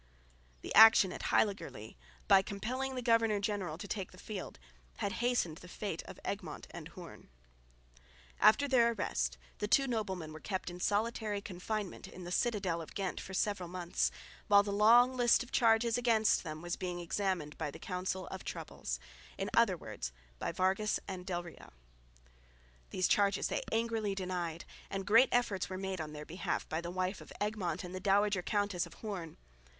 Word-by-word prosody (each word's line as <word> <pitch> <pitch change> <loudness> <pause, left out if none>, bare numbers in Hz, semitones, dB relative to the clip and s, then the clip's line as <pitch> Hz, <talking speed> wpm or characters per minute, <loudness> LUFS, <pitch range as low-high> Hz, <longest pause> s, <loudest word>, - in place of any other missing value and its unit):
The - - -4
action 220 -4 +8
at - - -6
Heiligerlee, 195 - 0 0.3
by 195 -1 +7
compelling 245 +7 -3
the 250 - -3
governor 230 -3 +3
general 200 -6 -2
to 190 - -7
take 195 -2 -4
the 185 - -15
field, 195 0 -6 0.4
had 200 - -1
hastened 240 -10 +1
the 180 - -12
fate 185 -2 -4
of - - -10
Egmont - - -4
and - - -8
Hoorn. - - -12 1.1
After 285 +6 +6
their 235 -3 +4
arrest - - -1 0.2
the 210 - -1
two 275 +6 +4
noblemen 190 -10 -3
were 155 - -8
kept 190 0 -3
in 175 - -9
solitary 210 +1 0
confinement 200 +1 -5
in 185 - -10
the 175 - -6
citadel 190 -6 0
of 160 - -10
Ghent 195 -2 -2
for 190 - -7
several 185 -3 -1
months, 175 -1 0 0.4
while 200 -1 +7
the 200 - -3
long 235 +5 +6
list 245 0 +4
of 250 - -14
charges 230 0 +3
against 225 -3 +3
them 155 -1 -6
was 175 0 -2
being 180 -1 -3
examined 175 -3 -2
by 160 -2 -1
the - - -9
Council 185 0 -3
of - - -7
Troubles - - -5 0.4
in - - -3
other - - +4
words - - -6 0.3
by - - -2
Vargas 190 +5 +1
and 185 -2 -6
del 175 -2 -2
Rio. 170 - -12 1.2
These 185 - +1
charges 200 -1 +2
they - - -1
angrily 225 -3 0
denied; 180 -3 -3 0.2
and 195 0 -3
great 230 +5 +6
efforts 220 -8 +1
were 185 - -4
made 190 -2 -3
on 155 -1 -5
their 150 0 -7
behalf 175 +5 -3
by 160 +1 -2
the 170 - -5
wife 185 +2 -2
of - - -13
Egmont 200 -5 -2
and 180 0 -7
the 185 - -4
dowager 200 0 +3
Countess 205 -1 0
of - - -15
Hoorn. 185 -7 -6
195 Hz, 175 wpm, -33 LUFS, 180-215 Hz, 1.2 s, action